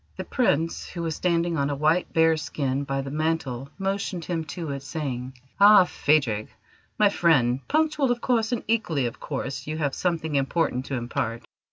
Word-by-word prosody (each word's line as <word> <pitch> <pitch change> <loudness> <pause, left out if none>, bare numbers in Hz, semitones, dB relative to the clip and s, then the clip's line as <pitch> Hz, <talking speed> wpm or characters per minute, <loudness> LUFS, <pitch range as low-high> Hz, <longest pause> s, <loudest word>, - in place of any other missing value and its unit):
The - - -3
Prince, 165 - 0
who 170 - -5
was 160 -2 -2
standing 170 -1 0
on 140 -1 0
a 145 - -1
white 155 +5 +1
bear's 160 -1 +3
skin 140 -1 -2
by 135 0 -1
the 135 0 -6
mantel, 150 -4 -2
motioned 195 -3 -2
him 165 -2 -2
to 165 -2 -5
it, 140 -1 -4
saying: 130 -4 -4 0.3
"Ah, 205 -2 +8
Phadrig, 135 -11 +1 0.5
my 210 -1 +5
friend, 135 -10 +3
punctual, 305 -3 +1
of 245 0 +1
course; 235 -2 +1
and 245 - -1
equally, 175 - +1
of 120 - -4
course, 135 +2 -5
you 155 +1 -3
have 145 -3 -1
something 165 -3 -1
important 135 -2 0
to 140 - -2
impart. 120 -1 -3
160 Hz, 180 wpm, -25 LUFS, 135-180 Hz, 0.5 s, Ah